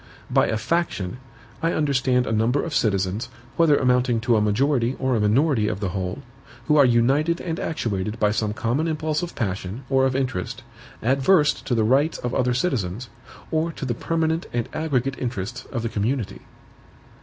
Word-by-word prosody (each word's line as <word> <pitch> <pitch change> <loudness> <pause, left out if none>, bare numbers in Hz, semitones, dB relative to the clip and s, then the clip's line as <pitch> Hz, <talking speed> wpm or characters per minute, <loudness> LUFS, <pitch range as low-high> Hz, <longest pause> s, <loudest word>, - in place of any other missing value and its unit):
By - - +4
a 110 - 0
faction, 115 - -1 0.4
I 165 +1 +1
understand 130 -4 +1
a - - -3
number 115 +5 +1
of 165 - -4
citizens, 100 -2 0 0.3
whether 160 -4 +4
amounting 125 -2 +2
to 120 0 +2
a 110 - +3
majority 125 +4 +1
or 130 -1 0
a - - +1
minority 110 +2 +2
of 105 -3 -2
the 100 -3 -2
whole, 95 +8 -4 0.4
who 150 - +3
are 145 -2 +7
united 135 +8 +2
and 165 -2 -4
actuated 105 -7 -2
by 105 -2 +3
some 105 -1 0
common 120 +9 -1
impulse 155 0 -1
of 175 -1 -5
passion, 100 +2 -3
or 135 0 +4
of 130 - -2
interest, 130 -2 -2 0.4
adversed 145 +5 +3
to 125 - +1
the 110 - +2
rights 135 +8 +2
of 125 0 -4
other 125 -1 +1
citizens, 120 - -1 0.4
or 160 +1 0
to 140 - -5
the 125 - -1
permanent 160 +5 -1
and 120 -1 -1
aggregate 135 -4 -1
interests 120 0 -4
of 120 -3 -3
the 115 - -1
community. 110 +2 -2
125 Hz, 180 wpm, -23 LUFS, 110-145 Hz, 0.4 s, are